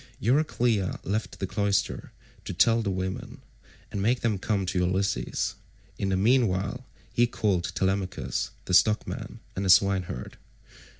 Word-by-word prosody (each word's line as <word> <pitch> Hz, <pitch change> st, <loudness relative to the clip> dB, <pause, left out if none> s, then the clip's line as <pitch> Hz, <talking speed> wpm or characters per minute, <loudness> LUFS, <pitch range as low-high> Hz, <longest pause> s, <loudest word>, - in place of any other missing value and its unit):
Euryclea 120 Hz, -, +1 dB
left 105 Hz, +4 st, -2 dB
the -, -, -2 dB
cloister 100 Hz, 0 st, -1 dB, 0.3 s
to -, -, -5 dB
tell 115 Hz, +5 st, +4 dB
the 105 Hz, -, -1 dB
women, 95 Hz, 0 st, -4 dB, 0.5 s
and 100 Hz, -2 st, -3 dB
make 120 Hz, +5 st, +2 dB
them 110 Hz, -4 st, 0 dB
come 100 Hz, -1 st, 0 dB
to 90 Hz, 0 st, -1 dB
Ulysses; 95 Hz, +2 st, 0 dB, 0.5 s
in 100 Hz, -, 0 dB
the 95 Hz, -, +1 dB
meantime 110 Hz, 0 st, +2 dB, 0.3 s
he 120 Hz, 0 st, +4 dB
called 100 Hz, -7 st, 0 dB
Telemachus, 95 Hz, 0 st, -1 dB, 0.2 s
the -, -, -3 dB
stockman, 105 Hz, +3 st, +2 dB
and 95 Hz, -, -2 dB
the 95 Hz, -, -1 dB
swineherd. 95 Hz, -7 st, +3 dB
100 Hz, 135 wpm, -27 LUFS, 95-110 Hz, 0.5 s, tell